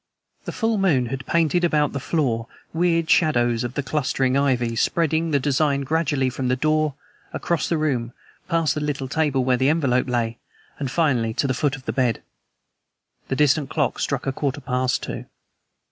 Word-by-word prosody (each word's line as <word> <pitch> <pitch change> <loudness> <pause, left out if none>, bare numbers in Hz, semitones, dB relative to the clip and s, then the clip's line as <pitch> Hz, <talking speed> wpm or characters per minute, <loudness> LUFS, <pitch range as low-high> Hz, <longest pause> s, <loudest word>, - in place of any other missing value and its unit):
The - - -4
full 225 -3 0
moon 155 -10 +3
had 135 +1 -5
painted 170 +1 +2
about 150 -4 +2
the 140 - -2
floor 125 -6 -1 0.3
weird 165 -1 +1
shadows 120 -9 +3
of 120 +1 -5
the 145 - -1
clustering 135 -2 0
ivy, 125 -4 +1
spreading 165 +5 +1
the 145 -2 +2
design 140 +1 +1
gradually 140 -3 0
from 130 0 -3
the 125 - +2
door, 155 +1 +1 0.4
across 170 -4 -1
the 170 - +1
room, 130 -6 -1 0.4
past 165 -4 +2
the 150 - -3
little 145 -2 -2
table 145 -2 +1
where 125 0 +2
the 130 +2 +2
envelope 135 -5 +1
lay, 115 -2 -1 0.4
and 140 -2 -2
finally 125 -8 +1
to - - 0
the 130 - +1
foot 145 +1 0
of 135 -1 -13
the - - -2
bed. 125 -4 0 1.0
The 135 - -1
distant 145 0 +2
clock 125 - -1
struck 140 -2 -2
a 135 - 0
quarter 140 0 -2
past 125 -1 -1
two. - - -5
140 Hz, 180 wpm, -23 LUFS, 125-155 Hz, 1.0 s, moon